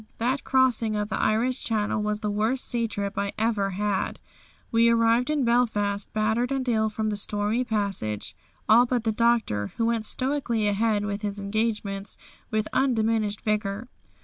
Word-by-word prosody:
That 255 +4 0
crossing 245 -4 +2
of 210 0 -2
the - - -1
Irish 240 +4 +1
Channel 215 -1 0
was 210 0 -2
the 210 -1 -1
worst 220 +5 0
sea 235 -2 0
trip 200 -2 -3
I 200 0 -1
ever 215 -3 +1
had. 200 +1 -1 0.5
We 230 0 +5
arrived 230 +2 +3
in 295 -4 +1
Belfast 210 -4 +1
battered 220 +4 0
and 265 -1 -1
ill 220 -2 +2
from 215 0 -2
the - - -1
stormy 210 +4 0
passage, 200 - -2 0.3
all 235 +3 +6
but 245 -2 0
the 225 - +1
Doctor, 220 - +1
who 230 - +1
went 230 -2 0
stoically 255 -5 -1
ahead 205 0 +1
with 200 0 -3
his 205 -1 -3
engagements 200 -1 -2 0.3
with 215 -1 0
undiminished 220 -5 +1
vigour. 210 +2 -2
220 Hz, 165 wpm, -26 LUFS, 205-235 Hz, 0.5 s, all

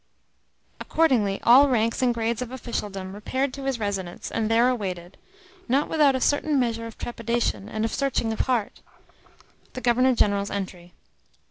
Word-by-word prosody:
Accordingly 240 -12 +1
all 270 +4 +7
ranks 230 -1 +1
and 250 -1 +3
grades 235 0 -2
of 250 - -4
officialdom 205 -6 -5
repaired 260 +6 -2
to 275 -1 -7
his 270 -2 -1
residence, 195 -5 -4
and 220 -1 -1
there 230 +2 +4
awaited 190 -7 -3 0.5
not 275 +4 +2
without 295 -4 +3
a - - 0
certain 290 +2 +1
measure 230 -2 -1
of 225 - -11
trepidation 235 -3 -2
and 215 0 -2
of 225 - -3
searching 260 -5 0
of - - -7
heart 235 -5 -1 0.9
the 255 - -6
Governor 250 +1 +3
General's 200 -2 +1
entry. 185 -3 -6
230 Hz, 155 wpm, -25 LUFS, 205-255 Hz, 0.9 s, all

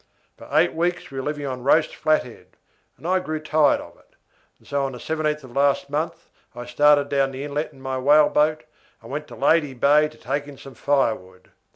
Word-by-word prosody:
For - - -14
eight - - +3
weeks 175 0 -2
we 135 - -5
were 130 - -5
living 145 -1 -3
on 130 -2 -4
roast 155 +4 +3
flat 155 0 +2
head, 125 -2 -15 0.4
and 165 - -8
I 185 +1 +2
grew 155 -3 -4
tired 155 -1 +2
of - - -12
it, - - -28 0.5
so 140 -1 -1
on 135 -1 -3
the - - -7
17th 150 +1 -2
of 130 -1 -13
last 140 0 +1
month 160 +3 -4 0.2
I 120 0 -7
started 145 +3 +4
down 140 -1 +1
the 135 +1 -7
inlet 145 +1 -3
in 135 - -18
my 130 -1 -3
whaleboat, 150 +2 +3 0.4
and - - -11
went - - -4
to - - -11
Lady 150 -5 +2
Bay 145 +4 +4
to 155 - -18
take 140 +4 -3
in 145 -2 -11
some 135 0 -12
firewood. 110 -12 -1
145 Hz, 210 wpm, -23 LUFS, 135-155 Hz, 0.5 s, started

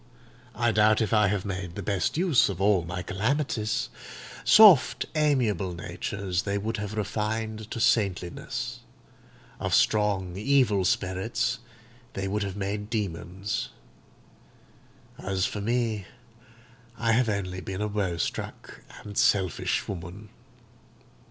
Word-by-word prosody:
I 120 -1 +2
doubt 110 0 +4
if 110 -1 0
I 105 -1 +5
have 100 0 -1
made 90 -3 -4
the 100 - -5
best 100 - -1
use 160 - +4
of 95 -3 -4
all 100 -3 +3
my 85 +2 -5
calamities. 110 - -1 0.5
Soft, 180 - +7
amiable 125 - +1
natures 95 +1 -3
they 100 +1 -2
would 110 +3 -2
have 105 0 -4
refined 110 +1 -3
to 115 - -5
saintliness; 95 -6 0 0.8
of - - +1
strong, 100 -4 +2
evil 110 -4 +2
spirits 100 +7 0 0.5
they 95 0 -3
would 105 +2 -1
have 100 -1 -3
made 105 +1 -3
demons; 100 -1 -3 1.5
as 95 0 -1
for 105 - -3
me, 115 -3 -1 0.9
I 115 0 +1
have 115 +1 +3
only 95 -3 -3
been 95 +2 -5
a 105 - 0
woe 100 -5 -1
struck - - -5 0.2
and 100 -1 -9
selfish 95 -3 +1
woman." 95 +3 -7
105 Hz, 125 wpm, -27 LUFS, 95-110 Hz, 1.5 s, Soft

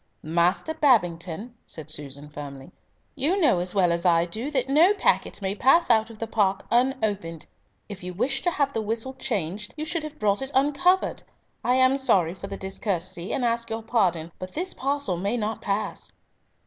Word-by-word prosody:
"Master 170 - +1
Babington," 200 - +1
said 155 -1 -9
Susan 145 -1 -6
firmly, 145 0 -9 0.4
"you 340 +9 +1
know 260 - +4
as 180 +2 -4
well 180 -3 +4
as 170 0 -1
I 170 -2 +4
do 220 +10 -4
that 265 -4 0
no 325 +9 +5
packet 305 - +1
may 190 0 0
pass 270 +9 +4
out 220 -1 +3
of 225 - -11
the 225 - -3
park 205 -3 0
unopened. 215 - 0 0.4
If 200 -3 -8
you 180 0 -5
wished 265 +9 -1
to - - +4
have 280 -4 0
the 225 - -1
whistle 225 +4 -3
changed 210 -5 -3
you 305 - -3
should 335 +1 -2
have 305 0 -8
brought 205 -2 +1
it 270 - -3
uncovered. 295 +7 +2 0.4
I 250 - +3
am 260 +1 +4
sorry 185 -11 +2
for 195 +1 -8
the 195 - -6
discourtesy, 185 -2 -3
and 250 - 0
ask 235 0 0
your 225 0 -4
pardon, 180 -8 +1
but 185 0 -7
this 360 +4 -1
parcel 275 -9 -1
may 200 +7 -1
not 215 -1 -3
pass." 205 +1 -3
215 Hz, 185 wpm, -25 LUFS, 180-265 Hz, 0.4 s, no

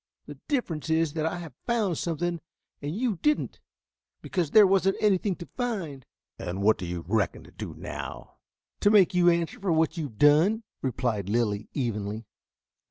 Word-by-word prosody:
The - - -10
difference 180 - -2
is 160 -2 +2
that 160 -1 -1
I 165 - -2
have 170 -3 -8
found 220 -7 +1
something 170 0 -2 0.4
and 145 +3 -4
you 225 -3 0
didn't, 300 - 0 0.6
because 175 -5 -1
there 210 +6 +8
wasn't 195 0 +3
anything 200 -2 +2
to 170 - -9
find." 190 - -3 0.3
"And 95 +3 -4
what 110 +2 +4
do 90 - -4
you 85 -1 -5
reckon 105 -2 0
to - - -16
do - - -7
now?" - - -7 0.4
"To 205 - +4
make 205 -4 +5
you 175 -1 +5
answer 170 -1 0
for 195 -3 -1
what 160 +1 +2
you 160 - -2
have 115 -7 -10
done," 160 - +4 0.2
replied 115 -6 -1
Lilly 105 -2 0
evenly. 110 -4 -3
160 Hz, 170 wpm, -27 LUFS, 120-195 Hz, 0.6 s, there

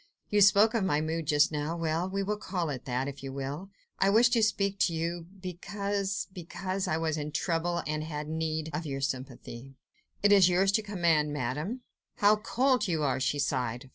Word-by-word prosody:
You 210 0 +4
spoke 200 +3 +6
of 225 -4 +1
my 150 -6 +2
mood 160 0 -2
just 150 0 +4
now; 150 +2 -2
well! 165 +2 -1
we 195 +1 -1
will 210 +2 -1
call 180 -6 -2
it 130 -3 -6
that, 130 +1 -1
if 140 0 -7
you 135 -1 -6
will. 140 +7 -5 0.3
I 195 - +4
wished 235 +4 +5
to 230 - +4
speak 200 -2 +1
to 170 - +2
you... 165 +1 -3
because... 200 +2 -3
because 185 +2 -4
I 155 - 0
was 160 -1 -1
in 150 0 -4
trouble... 170 +2 -1
and 155 0 -2
had 150 -1 -5
need... 160 0 -2
of 160 +1 -3
your 135 -1 -4
sympathy." 130 -1 -5 0.5
"It 205 - +5
is 195 -3 +7
yours 190 +2 +3
to 220 - +2
command, 170 -7 +1
Madame." 150 - -3 0.3
"How 210 +1 +4
cold 250 +3 +1
you 160 -4 0
are!" 135 -3 +1
she 145 +2 0
sighed. 130 -3 -2
165 Hz, 200 wpm, -29 LUFS, 150-195 Hz, 0.5 s, is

